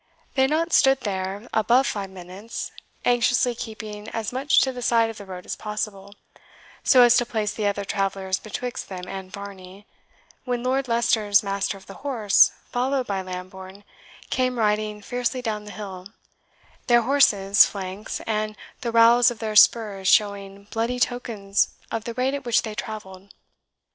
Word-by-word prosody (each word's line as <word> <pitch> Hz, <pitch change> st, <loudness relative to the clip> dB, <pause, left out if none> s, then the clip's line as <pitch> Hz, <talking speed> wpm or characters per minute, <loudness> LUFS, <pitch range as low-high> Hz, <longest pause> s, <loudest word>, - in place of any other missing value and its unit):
They 265 Hz, -, +1 dB
had 265 Hz, -, +4 dB
not 330 Hz, +3 st, 0 dB
stood 270 Hz, -1 st, +5 dB
there 195 Hz, +1 st, -4 dB
above 235 Hz, +5 st, +3 dB
five 200 Hz, -5 st, -3 dB
minutes, 190 Hz, +4 st, -8 dB, 0.3 s
anxiously 245 Hz, +1 st, +3 dB
keeping 215 Hz, -2 st, -7 dB
as 225 Hz, 0 st, -4 dB
much 270 Hz, +3 st, +3 dB
to 265 Hz, -, +1 dB
the 250 Hz, -1 st, -7 dB
side 230 Hz, -1 st, +2 dB
of 225 Hz, -, -13 dB
the 200 Hz, -, -10 dB
road 180 Hz, -1 st, -8 dB
as -, -, -4 dB
possible, 205 Hz, -2 st, -5 dB, 0.7 s
so 255 Hz, -2 st, +7 dB
as 240 Hz, 0 st, +6 dB
to 245 Hz, -, +3 dB
place 215 Hz, -3 st, -2 dB
the 210 Hz, -2 st, -1 dB
other 200 Hz, 0 st, -2 dB
travellers 195 Hz, -1 st, -1 dB
betwixt 245 Hz, +3 st, -6 dB
them 180 Hz, -1 st, -7 dB
and 190 Hz, -1 st, -7 dB
Varney, 200 Hz, 0 st, -10 dB, 0.6 s
when 245 Hz, -2 st, -2 dB
Lord 260 Hz, +1 st, 0 dB
Leicester's 220 Hz, -3 st, +2 dB
master 200 Hz, 0 st, -2 dB
of 190 Hz, -, -16 dB
the 195 Hz, -, -10 dB
horse, 235 Hz, -8 st, +4 dB, 0.2 s
followed 260 Hz, +1 st, 0 dB
by 195 Hz, -3 st, -2 dB
Lambourne, 185 Hz, +1 st, -9 dB, 0.5 s
came 255 Hz, -1 st, 0 dB
riding 210 Hz, -1 st, 0 dB
fiercely 245 Hz, +3 st, -2 dB
down 210 Hz, -3 st, -3 dB
the 210 Hz, -, -9 dB
hill, 190 Hz, -3 st, -8 dB, 0.8 s
their 240 Hz, -1 st, +5 dB
horses' 205 Hz, -7 st, +5 dB
flanks 195 Hz, +1 st, -6 dB
and 215 Hz, -1 st, -2 dB, 0.2 s
the 240 Hz, -4 st, -3 dB
rowels 235 Hz, +1 st, +6 dB
of 240 Hz, -, -6 dB
their 215 Hz, -1 st, -4 dB
spurs 210 Hz, -3 st, +4 dB
showing 200 Hz, -1 st, +2 dB
bloody 235 Hz, +2 st, -1 dB
tokens 220 Hz, -6 st, 0 dB, 0.2 s
of 225 Hz, -1 st, -3 dB
the 235 Hz, -, -5 dB
rate 255 Hz, +2 st, 0 dB
at 280 Hz, -1 st, -4 dB
which 240 Hz, -2 st, +2 dB
they 220 Hz, -, -5 dB
travelled. 200 Hz, -3 st, -8 dB
215 Hz, 165 wpm, -24 LUFS, 195-245 Hz, 0.8 s, so